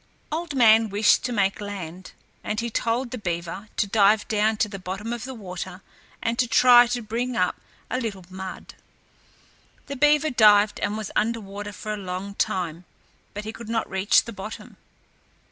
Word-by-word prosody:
Old 320 -1 -3
Man 225 -3 +5
wished 205 +2 +3
to 250 - -2
make 200 -3 0
land, 185 -3 -7 0.3
and 215 +1 -2
he 235 0 -3
told 235 +3 -1
the 250 - -5
beaver 175 +2 -4
to - - +2
dive 205 +1 +3
down 215 0 +1
to 215 - +1
the 195 -1 -8
bottom 195 +5 -5
of 240 -1 -5
the 265 0 -7
water 185 -2 -7 0.4
and 230 +1 -1
to 250 - +3
try 245 +1 +7
to 240 0 -2
bring 235 +3 -3
up - - +1 0.3
a 255 - -2
little 200 -7 -5
mud. 190 0 -8 1.1
The 280 - -6
beaver 295 +2 +3
dived 210 -3 +5
and 205 +1 -1
was 215 -2 -5
under 230 +2 +1
water 205 0 -7
for 215 +2 -5
a - - -4
long 190 +1 -5
time, 175 -3 -2 0.5
but 210 - -4
he 220 +1 -6
could 230 -1 -10
not 225 -1 -1
reach 190 +2 +3
the 230 - -8
bottom. 205 +2 -9
215 Hz, 180 wpm, -24 LUFS, 195-235 Hz, 1.1 s, try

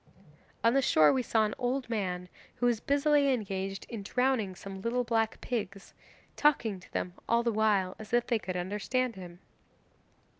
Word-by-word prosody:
'On 230 +1 +5
the 275 - +4
shore 155 - +5
we 260 - +1
saw 225 -2 +2
an 210 - -2
old 255 +1 -1
man 185 -6 -2 0.3
who 245 - -1
was 240 -2 +2
busily 285 +1 +3
engaged 195 -5 -3
in 230 -3 -6
drowning 225 -3 0
some 195 +1 -8
little 240 +3 0
black 225 -2 0
pigs, 200 -5 -4 0.4
talking 235 -9 +2
to 180 - -18
them 180 - -3 0.2
all 235 +1 +3
the 235 - +1
while, 205 -4 +2
as 215 -1 -10
if 240 0 +3
they 235 -3 +1
could 185 -3 -4
understand 210 +7 -1
him. 175 -2 -10
220 Hz, 175 wpm, -30 LUFS, 195-245 Hz, 0.4 s, On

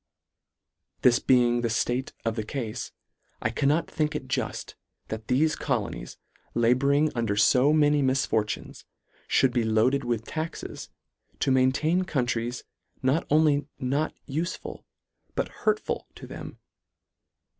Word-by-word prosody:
This 120 -1 +6
being 120 -2 +3
the 120 - +1
ftate 120 +3 -1
of 115 -1 0
the 110 - -2
cafe, 120 0 -4 0.5
I 110 - -1
cannot 145 +6 +1
think 150 -1 -1
it - - -4
juft, - - -3 0.4
that 110 0 -5
thefe 150 +5 +2
colonies, 115 - -3 0.4
labouring 140 +6 +3
under 115 -4 0
fo 130 +7 +5
many 150 -1 +4
misfortunes, 130 -6 -1 0.5
fhould 130 -2 +3
be 120 -2 +2
loaded 110 +5 +2
with 115 -2 -2
taxes, 160 0 -5 0.5
to 135 - +1
maintain 130 +7 +3
countries 120 -6 -1 0.4
not 135 +6 +1
only 150 -1 +3
not 140 +5 -1
ufeful, 165 +6 -4 0.5
but - - -1
hurtful 435 0 -1
to - - -10
them. - - -9
130 Hz, 125 wpm, -27 LUFS, 120-150 Hz, 0.5 s, This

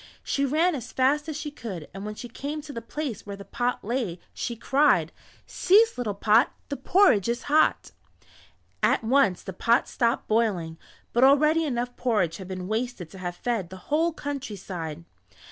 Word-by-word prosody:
She 280 - 0
ran 325 +6 +2
as 250 -4 -6
fast 290 +4 +1
as 305 - -4
she 300 -1 -5
could 195 - -7
and 195 +1 -7
when 210 - -5
she 245 - -7
came 285 +6 -5
to 290 -1 -9
the 230 - -5
place 250 -1 -5
where 200 -1 -7
the 200 0 -11
pot 245 0 -2
lay 220 -7 -2
she 235 - -4
cried: 255 - +3 0.3
"Cease 435 +5 +4
little 220 -5 -3
pot, 220 +5 +4 0.2
The 285 - -2
porridge 270 - +4
is 240 +1 -2
hot." 305 +2 +2 0.9
At - - +3
once 225 -6 +3
the 190 - -6
pot 230 +6 +2
stopped 235 0 0
boiling, 190 -8 0 0.3
but 240 - +3
already 305 +4 +5
enough 245 -3 -2
porridge 210 -10 0
had 190 - -9
been 185 -1 -5
wasted 220 -5 -3
to 190 - -11
have 175 -1 -4
fed 220 -5 -2
the 190 - -9 0.2
whole 330 +3 +3
countryside. 195 - -6
240 Hz, 180 wpm, -26 LUFS, 195-285 Hz, 0.9 s, already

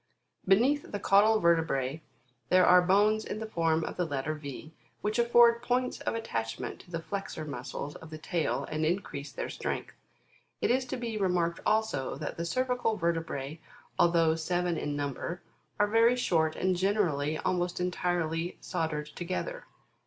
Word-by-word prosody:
Beneath 250 +10 +3
the 205 - -3
caudal 210 +3 +5
vertebrae, 160 -5 +1 0.5
there 185 0 +6
are 180 0 +7
bones 205 +4 +3
in 210 - -5
the 220 - -4
form 165 -6 +1
of - - -5
the 180 - +1
letter 145 0 -2
V, 150 +1 -8 0.3
which 210 +3 -1
afford 235 0 +5
points 250 +1 0
of - - -2
attachment 115 - -4
to - - -16
the 165 -2 -4
flexor 195 -5 -5
muscles 140 +1 -5
of 160 - -12
the 155 - -7
tail, 165 +1 -1
and 155 0 -1
increase 155 -4 -2
their - - -4
strength: - - -4 0.7
it - - +1
is 255 +1 +2
to 250 - -4 0.2
remarked 175 -3 +1
also, 220 -11 +1
that 150 - -5
the 170 - -3
cervical 250 +2 0
vertebra, 165 -4 -2 0.4
although 170 -2 +4
seven 175 +2 -1
in 145 -2 -3
num 145 -1 -2
ber, 170 +7 -5 0.4
are 205 - +5
very 230 +3 +4
short, 160 -10 +1
and 185 0 +1
generally, 175 -6 +1
almost 175 +1 -1
entirely 175 -2 -1
soldered 160 -4 -2
together. 185 - -5
175 Hz, 160 wpm, -30 LUFS, 155-210 Hz, 0.7 s, are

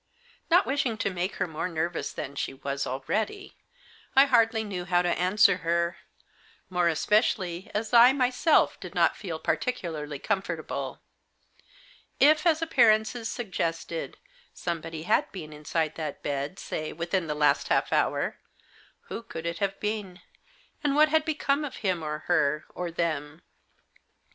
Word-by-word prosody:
Not 350 +3 +5
wishing 265 -5 0
to 200 - -1
make 180 +2 -2
her - - 0
more 160 +1 -4
nervous 170 +1 -2
than 140 -1 -6
she 135 - -3
was 140 +1 -3
already, 215 - -3 0.6
I 270 +1 +8
hardly 230 -4 +3
knew 190 -4 -5
how 175 0 +2
to 175 - +1
answer 180 +2 +4
her; 170 0 0 0.7
more 180 -1 +2
especially 185 0 +1
as 220 +2 -2
I 240 +2 +9
myself 260 +4 +2
did - - -9
not - - +3
feel - - -5
particularly 160 - -2
comfort 195 +6 -1
able. - - -5 1.2
If, 310 +4 +5
as 325 0 +3
appearances 230 -5 +3
suggested, 170 -7 -3 0.4
somebody 165 -2 -4
had - - +1
been 155 -5 -8
inside 155 +1 -2
that 155 -3 -5
bed, 140 +4 -3
say, 155 0 -4
within 170 +1 -2
the 150 - -2
last 150 0 +2
half - - +1
hour, - - 0 0.6
who - - -7
could 165 -8 -8
it 170 0 -3
have 195 -1 -1
been? 210 -3 -3 0.6
and 285 -1 +1
what 305 +1 +6
had 315 0 +2
become 295 -2 0
of 290 - -5
him 180 -3 +1
or 150 -1 -4
her, 155 -3 +1
or 180 -1 -4
them? 155 -2 -3
180 Hz, 150 wpm, -27 LUFS, 160-230 Hz, 1.2 s, I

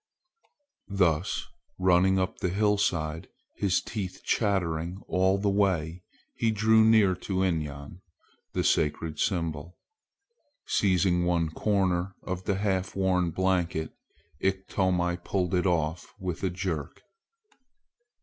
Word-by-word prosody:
Thus 90 -3 +1 0.3
running 95 +1 +4
up 95 +3 -1
the 90 - 0
hillside, 95 -6 0 0.3
his 95 -1 +1
teeth 95 -4 -5
chattering 90 -4 0
all 95 +1 +2
the 100 +1 -1
way, 90 -4 0 0.3
he 115 - 0
drew 110 +1 +4
near 110 -4 +5
to 95 0 -1
Inyan, 75 -2 -3 0.5
the - - 0
sacred 75 +1 0
symbol. 85 -2 -2 0.9
Seizing 90 -2 +2
one 85 -2 +1
corner 95 -1 0
of 95 0 -5
the 100 - +1
half 95 -1 -1
worn 95 -2 +1
blanket, 90 -3 0 0.5
Iktomi 95 -2 0
pulled 90 -3 -1
it 90 +1 +2
off 85 -1 -1
with 90 -3 -4
a 95 - +2
jerk. 85 -5 -4
90 Hz, 110 wpm, -28 LUFS, 85-95 Hz, 0.9 s, near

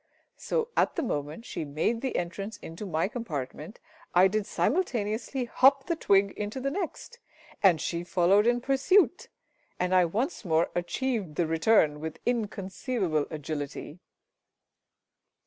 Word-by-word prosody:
So, 465 -1 -1
at - - +2
the 335 - -1
moment 150 - -3
she - - -4
made 155 +11 -1
the 265 - -2
entrance 195 +5 -3
into 165 +6 -8
my 165 0 0
compartment, 160 - -6 0.4
I 180 +2 +7
did 210 +1 -1
simultaneously 250 - -1
hop 270 +3 +4
the 340 - 0
twig 200 -9 +3
into 210 +5 -5
the 275 +1 -2
next, 395 +7 -5 0.4
and 180 -5 +5
she 170 +2 -2
followed 185 +4 +3
in 240 0 +2
pursuit, 275 +9 +2 0.5
and 180 +1 0
I 180 -1 +5
once 235 - -2
more 165 -3 +1
achieved 190 - -2
the 170 - +1
return 160 -2 +3
with 160 +1 -5
inconceivable 200 - -1
agility. 150 +1 -5
200 Hz, 135 wpm, -28 LUFS, 165-245 Hz, 0.5 s, I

